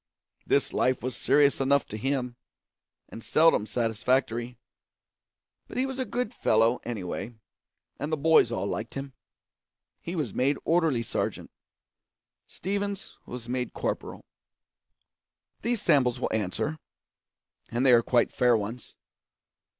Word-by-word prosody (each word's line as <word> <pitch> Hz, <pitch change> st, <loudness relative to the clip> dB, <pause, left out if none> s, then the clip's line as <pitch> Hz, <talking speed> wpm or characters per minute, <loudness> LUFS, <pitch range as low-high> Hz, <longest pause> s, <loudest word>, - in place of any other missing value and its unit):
This -, -, +2 dB
life 130 Hz, -1 st, +1 dB
was 130 Hz, 0 st, -3 dB
serious 140 Hz, -1 st, +3 dB
enough 140 Hz, +1 st, +3 dB
to -, -, -6 dB
him, 125 Hz, +1 st, -2 dB, 0.7 s
and 115 Hz, -, -9 dB
seldom 155 Hz, -9 st, +4 dB
satisfactory. 120 Hz, +1 st, 0 dB, 1.1 s
But -, -, -8 dB
he 255 Hz, -, +2 dB
was 265 Hz, 0 st, -5 dB
a 260 Hz, -, 0 dB
good 245 Hz, +1 st, -3 dB
fellow, 115 Hz, -, +2 dB
anyway, 115 Hz, +1 st, -5 dB, 0.6 s
and 145 Hz, +3 st, -3 dB
the 155 Hz, -, +1 dB
boys 155 Hz, -5 st, +4 dB
all 100 Hz, -4 st, -2 dB
liked 110 Hz, +3 st, -4 dB
him. 135 Hz, -1 st, -5 dB, 0.9 s
He 170 Hz, -, -5 dB
was 145 Hz, -, -2 dB
made 135 Hz, +2 st, +1 dB
orderly 160 Hz, -8 st, +2 dB
sergeant; -, -, -3 dB, 1.0 s
Stevens 200 Hz, +1 st, -4 dB
was 120 Hz, -1 st, -7 dB
made 125 Hz, 0 st, -2 dB
corporal. -, -, -4 dB, 1.4 s
These 235 Hz, -1 st, -1 dB
samples 125 Hz, -4 st, +3 dB
will -, -, -2 dB
answer 110 Hz, +9 st, -2 dB, 0.9 s
and 120 Hz, +3 st, 0 dB
they 130 Hz, -, +7 dB
are 120 Hz, -, +7 dB
quite 120 Hz, 0 st, +2 dB
fair 125 Hz, -2 st, +3 dB
ones. 110 Hz, +3 st, -6 dB
125 Hz, 125 wpm, -27 LUFS, 115-155 Hz, 1.4 s, they